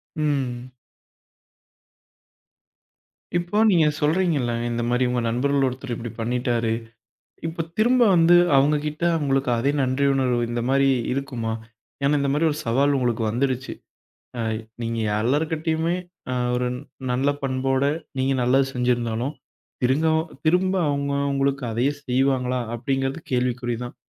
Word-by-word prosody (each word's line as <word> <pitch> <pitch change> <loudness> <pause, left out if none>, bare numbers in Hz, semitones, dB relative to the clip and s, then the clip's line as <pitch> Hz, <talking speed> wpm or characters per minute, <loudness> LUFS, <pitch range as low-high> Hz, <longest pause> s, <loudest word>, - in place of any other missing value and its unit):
ம். 130 -5 -2 2.7
இப்போ 175 +4 -2
நீங்க 170 -5 +4 0.2
சொல்றீங்கல்ல 150 -5 +1 0.2
"இந்த 120 0 -2
மாரி 125 +1 +2
உங்க 125 0 0
நண்பர்கள்ல 135 +3 +1
ஒருத்தர் 130 0 -6
இப்படி 115 0 -6
பண்ணிட்டாரு" 120 -1 0 0.8
இப்ப 165 +1 -3
திரும்ப 245 +3 +3
வந்து 170 +1 +6 0.2
அவங்ககிட்ட 150 +3 +1 0.2
உங்களுக்கு 135 -2 +1
அதே 135 +5 +1
நன்றியுணர்வு 130 -1 +1
இந்த 120 0 -2
மாரி 135 0 +3 0.3
இருக்குமா? 125 -5 -3 0.5
ஏன்னா 145 +1 +3
இந்த 140 0 0
மாரி 150 +3 +2
ஒரு 150 - -4
சவால் 140 +5 +2
உங்களுக்கு 120 -3 0
வந்துருச்சு. 130 +3 -1 0.7
ஆ - - -1 0.4
நீங்க 115 0 -2 0.2
எல்லார்கிட்டயுமே 160 +6 0 0.4
அ - - 0 0.2
ஒரு 125 0 0 0.4
நல்ல 130 +3 +1
பண்போட 135 0 0 0.4
நீங்க 135 +1 +1
நல்லது 130 +2 +3
செஞ்சிருந்தாலும் 125 +1 0 0.5
திருங்கவ் 155 +5 +3 0.3
திரும்ப 185 +3 +3
அவங்க 140 0 -1 0.2
உங்களுக்கு 135 -1 0
அதையே 125 +6 +1
செய்வாங்களா 130 -1 +1
அப்படிங்கறது 135 +4 -2
கேள்விக்குறிதான். 125 -1 -1
135 Hz, 115 wpm, -23 LUFS, 125-145 Hz, 2.7 s, வந்து